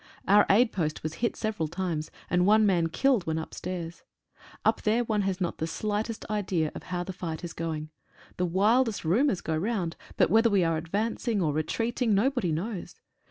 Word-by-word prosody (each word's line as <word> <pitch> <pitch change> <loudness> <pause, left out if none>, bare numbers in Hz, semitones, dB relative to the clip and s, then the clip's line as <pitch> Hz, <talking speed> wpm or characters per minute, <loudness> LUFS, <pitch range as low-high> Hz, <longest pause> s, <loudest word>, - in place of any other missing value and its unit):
Our 205 +1 +6
aid 225 +4 +5
post 155 -5 -2
was 155 0 -3
hit 235 - +1
several 215 -8 -2
times, 170 -2 -3 0.2
and 180 0 +2
one 215 +1 +5
man 175 -5 +3
killed 245 0 +2
when 160 0 0
upstairs. 170 +1 -5 0.6
Up - - +3
there 225 +3 +2
one 215 -3 0
has 195 -1 -1
not 175 -3 -2
the 160 - -1
slightest 215 +5 -3
idea 185 -7 -1
of - - -7
how 180 -1 -3
the 190 - -6
fight 165 -2 -5
is 170 - -5
going. 155 -2 -4 0.5
The 180 - +1
wildest 210 +4 +2
rumours 205 - +2
go 160 - -2
round, 185 -1 -1 0.2
but - - +3
whether 225 +2 +5
we 200 -4 +3
are 165 -1 +1
advancing 210 +6 -1
or 155 -5 +1
retreating 225 - 0
no 235 +8 +3
body 245 -11 -1
knows. 180 +4 -4
190 Hz, 190 wpm, -28 LUFS, 165-220 Hz, 0.6 s, Our